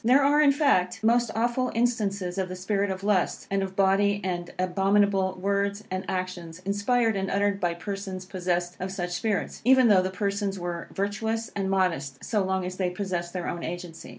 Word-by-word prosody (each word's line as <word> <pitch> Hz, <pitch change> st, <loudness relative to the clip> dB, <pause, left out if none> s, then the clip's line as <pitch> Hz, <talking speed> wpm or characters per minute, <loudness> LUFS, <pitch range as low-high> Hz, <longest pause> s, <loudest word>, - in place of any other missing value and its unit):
There 255 Hz, +5 st, +5 dB
are, 290 Hz, +2 st, +4 dB
in 290 Hz, -2 st, +6 dB
fact, 220 Hz, -, +2 dB
most 235 Hz, +1 st, +3 dB
awful 240 Hz, +3 st, 0 dB
instances 200 Hz, -6 st, 0 dB
of 185 Hz, -1 st, -1 dB
the 185 Hz, -, -5 dB
spirit 200 Hz, +2 st, -1 dB
of 190 Hz, 0 st, -4 dB
lust, 200 Hz, -3 st, +1 dB
and 195 Hz, 0 st, +1 dB
of 190 Hz, 0 st, -4 dB
bawdy 200 Hz, +1 st, +3 dB
and 175 Hz, -2 st, -3 dB
abominable 195 Hz, +1 st, +2 dB
words 200 Hz, +1 st, 0 dB
and 185 Hz, +1 st, -3 dB
actions, 180 Hz, -3 st, -4 dB
inspired 220 Hz, +3 st, +1 dB
and 195 Hz, 0 st, -1 dB
uttered 200 Hz, 0 st, +1 dB
by 175 Hz, -3 st, 0 dB
persons 190 Hz, 0 st, -5 dB
possessed 180 Hz, -1 st, -2 dB
of 185 Hz, +1 st, -3 dB
such 180 Hz, -2 st, -3 dB
spirits, 200 Hz, +3 st, -2 dB
even 255 Hz, 0 st, +6 dB
though 195 Hz, -3 st, +6 dB
the 185 Hz, -, -1 dB
persons 200 Hz, +1 st, -2 dB
were 175 Hz, -1 st, -4 dB
virtuous 220 Hz, +3 st, -2 dB
and 195 Hz, -1 st, -1 dB
modest 180 Hz, -8 st, 0 dB
so 215 Hz, -3 st, +1 dB
long 190 Hz, -1 st, -1 dB
as 185 Hz, 0 st, -5 dB
they 185 Hz, -2 st, 0 dB
possessed 180 Hz, -2 st, -3 dB
their 180 Hz, -2 st, -3 dB
own 170 Hz, -, -4 dB
agency. 175 Hz, -3 st, -6 dB
195 Hz, 190 wpm, -26 LUFS, 185-205 Hz, -, in